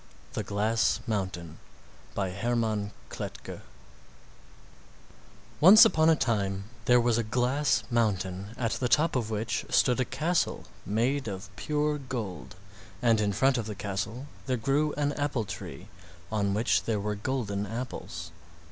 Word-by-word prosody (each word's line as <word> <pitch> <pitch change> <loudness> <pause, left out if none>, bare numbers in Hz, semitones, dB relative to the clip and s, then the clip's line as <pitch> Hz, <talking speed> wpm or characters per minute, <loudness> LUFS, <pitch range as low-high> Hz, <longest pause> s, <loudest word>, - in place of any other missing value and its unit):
THE - - -1
GLASS 110 +3 +1
MOUNTAIN 95 -7 -3 0.6
By 95 -2 -1
Hermann 110 0 0
R. 105 - -9 0.2
Kletke - - -7 2.0
Once 190 - +10
upon 160 -2 +4
a 165 - +6
time 100 -8 0 0.2
there 125 0 +6
was 120 -1 +2
a - - +1
glass 125 +4 +1
mountain 100 -3 -1
at 115 -3 0
the 125 - -1
top 155 +3 +3
of 115 -4 0
which 110 0 -1
stood 125 -1 +3
a 130 - +2
castle 165 +7 0 0.2
made 120 +6 0
of 95 -1 -7
pure 150 +7 0
gold, 110 - -5 0.4
and 115 -1 +3
in 105 -1 +1
front 130 +5 +2
of 110 - -4
the 105 - -5
castle 100 +6 -4 0.2
there 130 -1 +1
grew 140 +6 +1
an 145 0 0
apple 145 -6 -1
tree 95 - -8 0.4
on 100 -2 +1
which 95 -5 +2
there 110 -3 0
were 105 +1 -2
golden 105 -2 -2
apples. 95 -8 -6
115 Hz, 145 wpm, -28 LUFS, 100-130 Hz, 2.0 s, Once